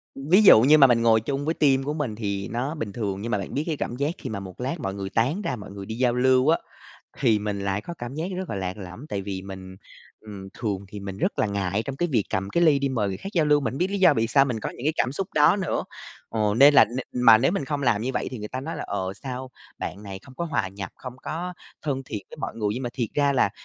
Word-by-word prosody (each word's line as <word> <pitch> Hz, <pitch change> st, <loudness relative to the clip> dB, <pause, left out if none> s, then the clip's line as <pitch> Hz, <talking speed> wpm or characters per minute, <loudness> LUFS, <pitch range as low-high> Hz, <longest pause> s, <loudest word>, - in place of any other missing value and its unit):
ví 155 Hz, +9 st, +4 dB
dụ 150 Hz, -, +9 dB
như 145 Hz, +6 st, +6 dB
mà 140 Hz, -3 st, +8 dB
mình 120 Hz, -2 st, +3 dB
ngồi 115 Hz, -1 st, +4 dB
chung 140 Hz, +5 st, -3 dB
với 160 Hz, -, +1 dB
team 135 Hz, -4 st, +3 dB
của 145 Hz, +2 st, -2 dB
mình 145 Hz, -8 st, -3 dB
thì 100 Hz, -2 st, -3 dB
nó 130 Hz, +7 st, -3 dB
bình 115 Hz, -9 st, -4 dB
thường 100 Hz, -3 st, -3 dB
nhưng 115 Hz, +2 st, -4 dB
mà 105 Hz, -, +2 dB
bạn 100 Hz, -, -6 dB
biết 145 Hz, -, 0 dB
cái 160 Hz, -3 st, -1 dB
cảm 120 Hz, -, -3 dB
giác 140 Hz, +4 st, 0 dB
khi 130 Hz, -, -6 dB
mà 110 Hz, -3 st, -4 dB
một 95 Hz, -2 st, -10 dB
lát 135 Hz, +7 st, -2 dB
mọi 95 Hz, -8 st, -3 dB
người 100 Hz, -1 st, -5 dB
tán 130 Hz, -, 0 dB
ra 135 Hz, -, -2 dB
mọi 105 Hz, -3 st, -10 dB
người 100 Hz, 0 st, -8 dB
đi 110 Hz, -, -5 dB
giao 125 Hz, 0 st, +2 dB
lưu 130 Hz, +2 st, +3 dB
á, 165 Hz, -, +5 dB, 0.6 s
thì 115 Hz, -5 st, +3 dB
mình 105 Hz, -1 st, -3 dB
lại 100 Hz, 0 st, -1 dB
có 170 Hz, -, -7 dB
cảm 120 Hz, +2 st, -6 dB
giác 160 Hz, +3 st, -3 dB
rất 185 Hz, 0 st, -4 dB
là -, -, -3 dB
lạc 95 Hz, 0 st, -3 dB
lõng. 95 Hz, +8 st, -9 dB
Tại 100 Hz, -7 st, -3 dB
vì 95 Hz, -1 st, -5 dB
mình, 95 Hz, -1 st, -9 dB, 0.4 s
ừm, 100 Hz, -3 st, -9 dB
thường 100 Hz, -5 st, -2 dB
thì 105 Hz, +1 st, -8 dB
mình 100 Hz, -1 st, -6 dB
rất -, -, -1 dB
là -, -, +3 dB
ngại 100 Hz, 0 st, -1 dB
trong 135 Hz, +2 st, -6 dB
cái 175 Hz, +4 st, 0 dB
việc 115 Hz, -5 st, +3 dB
cầm 95 Hz, +1 st, -1 dB
cái 170 Hz, -, +1 dB
ly 155 Hz, -4 st, +5 dB
đi 140 Hz, 0 st, 0 dB
mời 115 Hz, -6 st, 0 dB
người 95 Hz, -, -3 dB
khác 195 Hz, -, -7 dB
giao 165 Hz, -3 st, +3 dB
lưu, 150 Hz, -1 st, +4 dB
mình 125 Hz, -5 st, -2 dB
hông -, -, -5 dB
biết 180 Hz, -, +2 dB
lý 200 Hz, -, -1 dB
do 180 Hz, -5 st, +6 dB
vì 115 Hz, -3 st, +1 dB
sao 135 Hz, +4 st, +4 dB
mình 120 Hz, -5 st, -3 dB
có -, -, -3 dB
những 125 Hz, -, -6 dB
cái 155 Hz, -, +3 dB
cảm 125 Hz, -, +1 dB
xúc 190 Hz, +6 st, -3 dB
đó 150 Hz, +5 st, +5 dB
nữa? 190 Hz, -6 st, -1 dB, 0.4 s
Ờ, 105 Hz, -2 st, 0 dB
nên 140 Hz, +4 st, +8 dB
là -, -, +9 dB
n 125 Hz, +1 st, -5 dB
mà 115 Hz, -2 st, +9 dB
nếu 130 Hz, -, +2 dB
mình 195 Hz, -8 st, -1 dB
không 145 Hz, +1 st, -3 dB
làm 115 Hz, -5 st, +2 dB
như 125 Hz, -, -1 dB
vậy -, -, -1 dB
thì 125 Hz, -, -6 dB
người 105 Hz, 0 st, -6 dB
ta 130 Hz, -, -4 dB
nói 160 Hz, +5 st, -5 dB
là -, -, -4 dB
"Ờ, 95 Hz, -2 st, -3 dB
sao 130 Hz, -1 st, -5 dB, 0.3 s
bạn 100 Hz, -, -5 dB
này 100 Hz, -2 st, -7 dB
không 130 Hz, -, -15 dB
có 170 Hz, -, -3 dB
hòa 155 Hz, -, -1 dB
nhập, 100 Hz, -1 st, -7 dB
không 125 Hz, -1 st, -9 dB
có 175 Hz, +3 st, -4 dB, 0.3 s
thân 135 Hz, -3 st, -2 dB
thiện 105 Hz, -6 st, -6 dB
với -, -, -10 dB
mọi -, -, -5 dB
người?" 105 Hz, -2 st, -1 dB
Nhưng 130 Hz, -, -4 dB
mà 120 Hz, -, -3 dB
thiệt 120 Hz, -4 st, -2 dB
ra 145 Hz, -1 st, +3 dB
là, 125 Hz, -6 st, +3 dB
120 Hz, 300 wpm, -25 LUFS, 100-140 Hz, 0.6 s, dụ